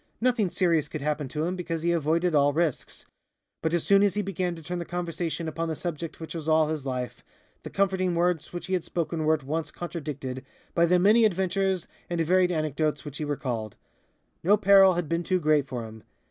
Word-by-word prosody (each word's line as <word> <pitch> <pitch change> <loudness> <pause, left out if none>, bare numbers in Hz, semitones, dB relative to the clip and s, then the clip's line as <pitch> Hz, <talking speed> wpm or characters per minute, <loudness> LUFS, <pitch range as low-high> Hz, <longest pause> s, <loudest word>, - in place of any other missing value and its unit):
Nothing 235 -5 +2
serious 165 -5 +1
could 150 - -6
happen 150 -1 -1
to 150 +4 -3
him, 180 +2 -1
because 165 -3 -4
he 170 - +2
avoided 165 +2 +1
all 145 -1 +4
risks. 160 -3 -2 0.6
But 160 - 0
as 170 -1 +1
soon 200 0 +5
as 200 -2 +3
he 210 - 0
began 185 -2 -2
to 165 - -11
turn 175 +3 -4
the - - -3
conversation 170 -1 -3
upon 165 +1 -3
the 160 - -2
subject 165 -1 -5
which 160 - -7
was 160 -2 -4
all 155 -1 +4
his 150 -3 -3
life, 125 -1 -4 0.4
the - - -8
comforting 190 -2 +1
words 170 -2 0
which 175 - -6
he 190 - -4
had 180 -3 +1
spoken 165 -2 -2
were 160 +1 +4
at 150 - -9
once 155 +3 -2
contradicted 145 -7 -5 0.3
by 170 0 +3
the 180 +2 +4
many 210 +6 +5
adventures 190 -2 +1 0.2
and 175 -1 -2
varied 180 +2 +3
anecdotes 155 -2 -1
which 145 0 -7
he - - -2
recalled. 120 -7 -3 0.7
No 200 +5 +5
peril 195 -2 +6
had 175 -2 -2
been 170 +2 0
too 185 +1 0
great 150 -3 +2
for 120 -3 -4
him. 110 0 -11
165 Hz, 215 wpm, -27 LUFS, 150-180 Hz, 0.7 s, peril